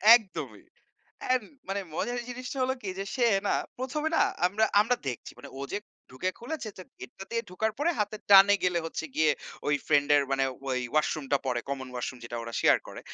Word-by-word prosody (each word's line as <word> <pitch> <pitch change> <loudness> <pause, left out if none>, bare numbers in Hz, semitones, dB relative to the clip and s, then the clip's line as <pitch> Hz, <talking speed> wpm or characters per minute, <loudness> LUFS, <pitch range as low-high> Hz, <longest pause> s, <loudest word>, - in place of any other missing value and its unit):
একদমই। 220 -6 -4 0.6
অ্যান্ড 255 -3 +1 0.2
মানে 195 +1 -1
মজার 245 +8 -1
জিনিসটা 255 +2 -6
হলো 260 +1 +1
কি 200 - -4
যে, 195 - -2
সে 250 - +3 0.2
না - - +2 0.3
১ম 265 +4 -3
এ - - -10
না - - +5 0.2
আমরা 205 +4 +2 0.2
আমরা 245 +4 +2
দেখছি। 125 - -5
মানে - - -10
ও - - -6
যে 205 - 0 0.3
ঢুকে 130 +9 -2
খুলেছে 245 -1 -5
যে - - -7 0.2
গেটটা 130 +9 -9
দিয়ে 230 0 0
ঢোকার 220 +4 -1
পরে, 310 +4 +2
হাতের 210 0 -2
ডানে 200 +1 +9
গেলে 180 -1 +2
হচ্ছে 160 - -4
গিয়ে 155 -1 +4 0.4
ওই 145 - +3
ফ্রেন্ড 145 -2 +3
এর 145 - +4
মানে 135 0 +2 0.2
ওই 130 -1 0
ওয়াশরুমটা 150 -2 +1
পড়ে, 125 -2 0
কমন 135 -1 -3
ওয়াশরুম 125 +1 -4
যেটা 120 0 -5
ওরা 115 0 -7
শেয়ার - - +5
করে। - - -8
195 Hz, 200 wpm, -28 LUFS, -, 0.6 s, ডানে